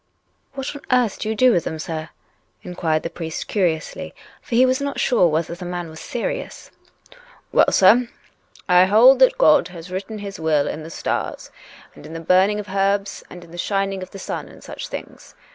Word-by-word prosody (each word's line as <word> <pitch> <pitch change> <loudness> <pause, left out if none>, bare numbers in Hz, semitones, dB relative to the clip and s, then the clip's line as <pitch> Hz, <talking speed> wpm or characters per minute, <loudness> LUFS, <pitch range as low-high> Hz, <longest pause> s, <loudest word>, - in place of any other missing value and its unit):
" - - -45
What 270 +1 -4 0.5
do 215 - -3
you 220 - -1
do 255 +3 +5
with 175 - +2
them, 160 - -4
sir? 155 0 -5 0.3
" - - -42
inquired 160 -3 -1
the - - -3
priest 165 -1 -6
curiously, 170 -6 -2 0.3
for 235 - -4
he 250 +2 +6
was 260 +2 +1
not 280 0 -3
sure 235 -9 +3
whether 160 +1 -1
the 175 - -8
man 175 -2 -5
was 160 - -11
serious, 240 - -5 0.4
" - - -24
Well, - - +4
sir, 235 +6 +5 0.6
I 180 -1 +6
hold 240 +7 +6
that 260 - +5
God 155 - +5
has 175 0 -11
written 195 +4 -5
His 200 -1 -7
will 155 -3 +1
in 155 - -4
the 155 - -9
stars, - - -4 0.4
and - - -15
in 160 - -10
the 165 - -5
burning 185 +5 +3
of 210 -1 -7
herbs, 195 +1 0
and 175 -1 -11
in 165 - -16
the 175 - -9
shining 195 0 -1
of 185 - -7
the - - -10
sun, 190 - -5
and - - -15
such - - -7
things. - - -9
185 Hz, 205 wpm, -21 LUFS, 165-215 Hz, 0.6 s, he